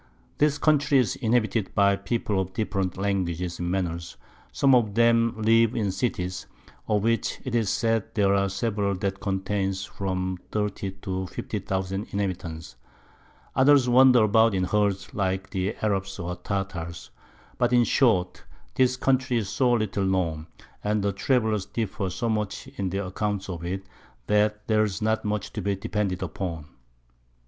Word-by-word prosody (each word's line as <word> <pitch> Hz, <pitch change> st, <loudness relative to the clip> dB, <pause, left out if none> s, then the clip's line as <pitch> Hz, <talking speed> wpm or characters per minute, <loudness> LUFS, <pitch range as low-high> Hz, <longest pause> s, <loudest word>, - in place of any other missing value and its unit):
This 145 Hz, -1 st, +3 dB
Country 145 Hz, -1 st, +3 dB
is 125 Hz, -7 st, +2 dB
inhabited 110 Hz, -3 st, 0 dB
by 100 Hz, 0 st, +4 dB
People 100 Hz, -1 st, -1 dB
of 95 Hz, 0 st, -5 dB
different 95 Hz, -4 st, -2 dB
Languages 90 Hz, -3 st, -2 dB
and 85 Hz, 0 st, -2 dB
Manners; 85 Hz, -2 st, -3 dB, 0.3 s
some 135 Hz, -1 st, +3 dB
of 110 Hz, -5 st, +3 dB
them 115 Hz, 0 st, +4 dB
live 115 Hz, +1 st, +4 dB
in 105 Hz, -4 st, 0 dB
Cities, 95 Hz, -4 st, -3 dB, 0.4 s
of 105 Hz, -2 st, +1 dB
which 115 Hz, 0 st, 0 dB
'tis 115 Hz, -5 st, 0 dB
said 115 Hz, 0 st, +1 dB
there 100 Hz, -2 st, +3 dB
are 100 Hz, 0 st, +2 dB
several 100 Hz, 0 st, -1 dB
that 95 Hz, +1 st, -3 dB
contain 95 Hz, 0 st, -1 dB
from 95 Hz, -1 st, -3 dB
30 105 Hz, -2 st, -2 dB
to 95 Hz, -1 st, -3 dB
50000 95 Hz, +3 st, -3 dB
Inhabitants; 85 Hz, -8 st, -4 dB, 0.8 s
others 135 Hz, -1 st, +5 dB
wander 125 Hz, -1 st, +6 dB
about 110 Hz, 0 st, +4 dB
in 95 Hz, -, +1 dB
Herds 100 Hz, +1 st, 0 dB
like 95 Hz, -1 st, -2 dB
the 95 Hz, +2 st, -1 dB
Arabs 95 Hz, -2 st, -1 dB
or 90 Hz, -1 st, -4 dB
Tartars; 90 Hz, -2 st, -5 dB, 0.5 s
but -, -, +2 dB
in 120 Hz, -1 st, +5 dB
short, 110 Hz, -8 st, +2 dB, 0.3 s
this 130 Hz, -1 st, +2 dB
Country 130 Hz, -1 st, +1 dB
is 105 Hz, -4 st, -2 dB
so 120 Hz, +3 st, +2 dB
little 105 Hz, -4 st, 0 dB
known, 85 Hz, -5 st, -1 dB, 0.4 s
and 105 Hz, 0 st, 0 dB
Travellers 110 Hz, -3 st, +1 dB
differ 100 Hz, -4 st, -3 dB
so 120 Hz, +6 st, -3 dB
much 105 Hz, -2 st, -2 dB
in 95 Hz, -2 st, -3 dB
their 100 Hz, +2 st, -2 dB
Accounts 100 Hz, +1 st, -3 dB
of 85 Hz, -2 st, -5 dB
it, 95 Hz, +2 st, -3 dB, 0.4 s
that 105 Hz, 0 st, +1 dB
there's 110 Hz, -3 st, +1 dB
not 110 Hz, 0 st, 0 dB
much 105 Hz, 0 st, -3 dB
to -, -, -3 dB
be 100 Hz, -1 st, 0 dB
depended 95 Hz, -1 st, -2 dB
upon. 85 Hz, -6 st, -4 dB
100 Hz, 150 wpm, -26 LUFS, 95-115 Hz, 0.8 s, wander